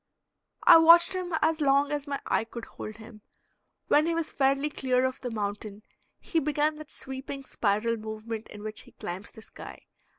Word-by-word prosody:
I - - +9
watched 335 +2 +7
him 360 -2 -3
as 320 0 +1
long 280 0 +3
as 290 0 -3
my 280 -1 -3
eye - - +1
could 230 +1 -8
hold 215 - -9
him. 220 0 -13 0.7
When 300 +2 +4
he 335 - 0
was 330 -1 -2
fairly 275 +2 +1
clear 255 -2 +1
of 260 +1 -3
the 250 - -4
mountain 210 -1 -5 0.4
he 330 - -1
began 300 +1 0
that 310 -1 -10
sweeping 265 +1 -7
spiral 220 +1 0
movement 220 +1 -6
in 210 0 -11
which 215 0 -5
he - - -18
climbs 180 +3 -7
the 220 - -12
sky. - - -12
265 Hz, 185 wpm, -28 LUFS, 220-300 Hz, 0.7 s, I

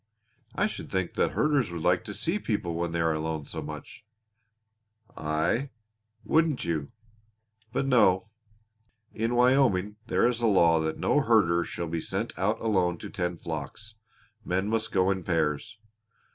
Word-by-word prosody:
"I - - +2
should - - -5
think 95 -2 -1
the - - +2
herders 145 -8 +1
would 85 -2 -5
like 90 0 +2
to 105 - -6
see 180 +6 -1
people 100 - -2
when 85 0 -2
they 85 0 -1
are 80 -1 +2
alone 80 -1 -3
so - - -6
much." - - -9 1.1
"Aye. 80 - 0 0.5
Wouldn't 160 -3 +1
you! 80 -4 -2 0.8
But 135 - -1
no. 110 -7 +3 0.8
In 115 +2 -1
Wyoming 120 -6 +3
there 115 - +3
is 120 -1 -1
a 115 - +3
law 85 -5 +5
that 80 0 -2
no - - +2
herder 85 +1 +3
shall 85 - -5
be 80 0 -3
sent - - -3
out 105 +4 0
alone 95 -6 +1
to - - -9
tend 90 -2 -3
flocks; 85 +7 -6 0.5
men 95 +3 -1
must 115 0 -1
go 95 -1 +3
in 95 -1 -2
pairs. 85 +5 -1
95 Hz, 160 wpm, -28 LUFS, 85-115 Hz, 1.1 s, law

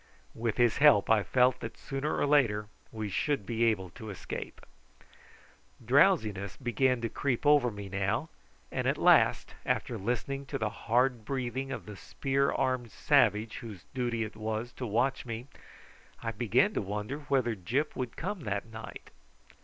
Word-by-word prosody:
With 115 -1 -2
his 120 -2 +3
help 140 -9 +6
I 110 -2 +5
felt 125 +4 +3
sure - - -31
that 115 - -7
sooner 135 +3 -3
or - - +2
later 125 -8 +3 0.3
we 110 -2 -4
should 135 +3 -1
be 115 +2 +1
able 95 -6 0
to 110 +1 -9
escape. 100 - -6 1.3
Drowsiness 110 - +3
began 125 0 +1
to 115 - 0
creep 130 +2 -2
over 145 -4 +5
me 105 -2 -7
now, 100 - -1 0.4
and - - -1
at - - +1
last, - - +4
after - - -1
listening 130 +6 -3
to 140 - -3
the 110 -4 -1
hard 120 +1 +1
breathing 130 +1 -3
of 115 - -5
the 105 0 -8
spear 135 +7 0
armed 130 -3 0
savage 105 +2 +2
whose 105 -7 -9
duty 120 -3 -1
it 110 -1 -7
was 110 +2 -3
to 125 - -5
watch 120 +6 +1
me, 115 +1 -5 0.8
I 115 - -1
began 120 - +2
to - - 0
wonder 105 +7 -4
whether 135 -5 0
Gyp 125 - -1
would 125 -3 -4
come 200 +3 -3
that 105 -8 -3
night. 110 0 -10
120 Hz, 165 wpm, -30 LUFS, 110-135 Hz, 1.3 s, help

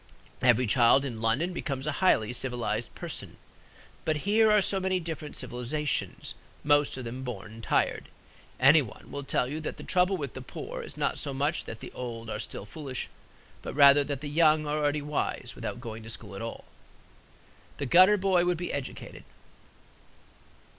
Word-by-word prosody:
Every 125 0 +4
child 120 +4 +5
in 115 -5 -5
London 135 +11 +1
becomes 135 -5 -3
a 155 - 0
highly 120 - +3
civilized 120 -3 -2
person. - - -7 0.7
But 155 0 -1
here 215 +2 +5
are 210 - +6
so 195 0 +1
many 185 0 0
different 160 -3 -6
civilizations, 130 +4 -3 0.3
most 145 -2 +3
of 130 - -6
them 125 +3 -5
born 110 -2 -7
tired. - - 0 0.5
Anyone 135 -3 +3
will 140 - -5
tell 125 - 0
you 150 +4 -4
that 155 - -5
the - - -9
trouble 180 +1 +2
with 140 -6 -5
the 130 - -7
poor 125 - -7
is - - -9
not - - -1
so 140 - -3
much 145 +4 0
that 110 - -8
the - - -8
old 115 -2 -6
are 105 - -3
still 100 - -6
foolish, 135 +1 -5 0.5
but - - -6
rather 140 0 +7
that 140 -1 -4
the 150 - -5
young 155 0 +4
are 150 +1 -1
already 145 0 0
wise. 150 0 -2
Without - - -5
going 115 -1 -7
to 110 - -10
school 105 -3 -7
at 95 - -6
all, 115 0 -6 1.1
the 140 - -3
gutter 185 +9 +7
boy 185 -2 +3
would 175 -1 +1
be 175 +1 -4
educated. 140 -2 -6
140 Hz, 175 wpm, -28 LUFS, 120-155 Hz, 1.1 s, rather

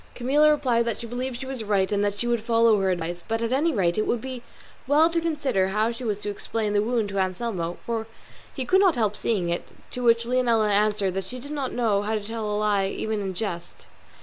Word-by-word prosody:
Camilla 285 +5 +4
replied 250 -6 +2
that 230 -2 -2
she 235 - -6
believed 245 +1 -4
she 265 - -6
was 260 -3 -5
right 200 -2 +1
and 205 0 +1
that 205 0 -1
she 240 - -2
would 240 -1 +1
follow 230 -2 +3
her 190 - +1
advice, 175 -1 -3
but 225 +1 -1
at 230 +1 -2
any 295 +6 +2
rate 185 - +1
it 215 - 0
would 240 - +1
be 255 0 -6 0.5
well 310 +4 +4
to 335 0 0
consider 285 - 0
how 215 +4 +1
she 235 +2 -8
was 215 -4 -1
to 210 0 -5
explain 210 +1 -3
the 205 - +3
wound 225 -1 0
to 200 -1 -2
Anselmo, 185 -2 -2
for 225 -1 -2 0.4
he 260 - -4
could 380 +6 +4
not 375 -6 +4
help 215 -4 0
seeing 195 -7 -1
it; 170 - -2 0.2
to 250 - -5
which 230 -1 +3
Leonela 235 -4 +2
answered 205 -2 +2
that 195 0 -3
she 255 - -7
did 285 +4 -8
not 280 -3 -2
know 220 -5 +1
how 215 +2 -1
to 210 - -3
tell 220 0 -4
a 205 - 0
lie 205 -2 +2
even 215 +2 -2
in 190 -2 -4
jest. 175 -4 -5
225 Hz, 245 wpm, -25 LUFS, 205-250 Hz, 0.5 s, Camilla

